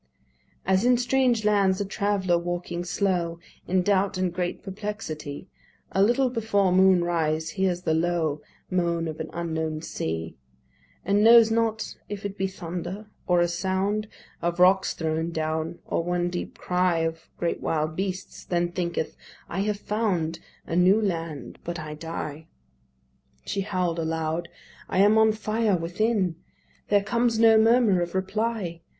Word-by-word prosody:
As 190 +2 +3
in 245 0 +4
strange 245 -2 +2
lands 200 -3 +3
a 205 - -1
traveller 195 -2 0
walking 175 0 -3
slow, 175 -2 0 0.3
In 185 0 +2
doubt 200 0 +2
and 185 -2 0
great 175 0 -3
perplexity, 190 -7 -6 0.4
A 195 - +1
little 245 +5 +3
before 210 -5 +1
moon 185 -1 +5
rise 160 -2 0
hears 185 -2 0
the 160 - +1
low 160 -2 0 0.3
Moan 170 -2 0
of 155 0 -6
an 160 - -4
unknown 160 -2 -3
sea; 80 - -4 0.7
And 200 +2 +3
knows 230 0 +8
not 225 -1 0
if 205 0 -6
it 200 -1 -4
be 195 -1 -1
thunder, 190 +3 -6 0.2
or 175 -2 +4
a 175 - +3
sound 190 +4 -1 0.3
Of 170 +1 -1
rocks 190 +1 +4
thrown 160 0 -1
down, 160 +1 -2
or - - -1
one 175 0 -1
deep 175 - -5
cry 180 -2 +1
Of 165 0 -3
great 170 - -2
wild 155 0 -1
beasts; 190 0 -4
then 175 -1 0
thinketh, 170 -3 -2 0.3
"I 175 - -4
have 205 +1 0
found 190 -7 -1 0.3
A 165 - -3
new 185 +4 +5
land, 165 - -3
but 170 0 -4
I 155 -1 -6
die." 155 -1 -6 1.0
She 200 - -2
howl'd 180 -4 -1
aloud, 160 +1 -2 0.4
"I - - -2
am 205 +3 +6
on 220 0 +5
fire 215 -1 0
within. 180 +1 0 0.5
There 205 -1 +3
comes 235 +1 +1
no 225 -1 +6
murmur 225 -4 +4
of 175 +1 -3
reply. 190 -2 -2
180 Hz, 150 wpm, -26 LUFS, 165-205 Hz, 1.0 s, knows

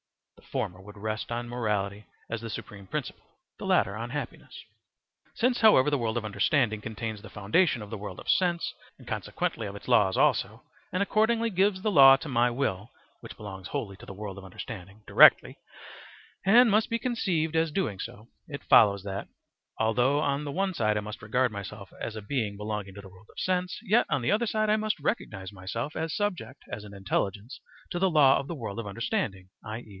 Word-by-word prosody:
(The - - -21
former 90 +1 -3
would 105 +2 -13
rest 110 +2 -4
on 120 +1 -3
morality 105 -4 -2 0.2
as 115 -1 -4
the 115 - -6
supreme 100 -2 -8
principle, - - -5 0.4
the - - -6
latter 100 - +2
on 115 +2 -5
happiness.) 135 -1 -7 0.7
Since, 245 0 +1
however, 150 - +6
the 145 - +1
world 115 0 -1
of 115 - -2
understanding 110 0 +1
contains 110 -1 -5
the 110 - -11
foundation 110 - +1
of 105 - -11
the 110 - -4
world 100 -2 -7
of - - -11
sense, 175 -2 +1 0.2
and - - -16
consequently - - -3
of - - -7
its - - -11
laws 95 -2 +4
also, - - +1 0.3
and 185 +2 +1
accordingly 225 +2 +2
gives 190 0 +1
the 215 - +1
law 135 -5 +9
to 160 - -8
my 125 -2 +2
will 110 -5 -2 0.3
(which - - -10
belongs 95 -3 -8
wholly 115 -9 -4
to - - -13
the 100 - -8
world 100 -1 -6
of - - -12
understanding) 95 +1 -9
directly, - - +6 0.8
and 230 +4 +6
must 215 +2 +3
be 230 - +1
conceived 185 -10 -1
as 160 -1 +2
doing 145 - -1
so, 105 +3 -8 0.2
it 140 -2 -7
follows 100 -3 +5
that, 100 0 -5 0.5
although 120 +6 +2
on 140 -1 0
the 145 - -4
one 190 +5 0
side 105 -8 +1
I - - 0
must 105 +2 -8
regard 125 +3 +1
myself 100 -1 -8
as 110 - -4
a 110 - -5
being 105 -3 -2
belonging 105 -2 -4
to 100 - -8
the 100 - -12
world 95 +3 -18
of - - -10
sense, 180 -1 -1
yet 225 +2 +3
on 130 - 0
the - - +1
other 225 +3 +2
side 215 0 0
I - - +5
must 215 0 -1
recognize 100 - -3
myself 105 +9 -5
as 160 0 -2
subject 175 - -3
as 105 +1 -6
an 100 -1 -11
intelligence 100 +3 -3 0.3
to 175 - -2
the 190 +1 +3
law 145 -5 +5
of 140 - -6
the 170 - -4
world 115 -5 -5
of 115 - -5
understanding, 100 - -3
i.e. 110 +1 -7
115 Hz, 205 wpm, -28 LUFS, 105-165 Hz, 0.8 s, law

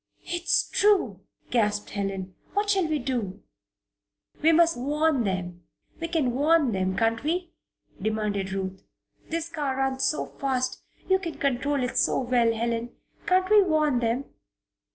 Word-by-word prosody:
"It's 345 0 +1
true!" 380 - +3 0.3
gasped 210 -3 +1
Helen. 195 -2 -3 0.2
"What 410 0 +2
shall 380 -4 +2
we 310 -1 0
do?" 240 -8 -3 1.0
"We 320 +2 +5
must 335 +1 +4
warn 290 0 +1
them 175 -2 -3 0.3
we 330 - -2
can 320 -7 +1
warn 290 +1 +3
them, 190 -1 -1
can't 225 +1 +1
we?" 345 +3 -1 0.5
demanded 210 -2 -1
Ruth. 190 -1 -4 0.5
"This 330 0 -2
car 290 -5 -2
runs 265 0 0
so 300 - +1
fast 255 -2 -2 0.3
you 380 0 +4
control 285 -5 -1
it 250 - -2
so - - +2
well, 240 -2 +2
Helen. 235 +1 -2 0.3
Can't 370 0 +3
we 425 -1 +8
warn 305 -8 +2
them?" 235 +3 0
260 Hz, 140 wpm, -26 LUFS, 220-320 Hz, 1.0 s, we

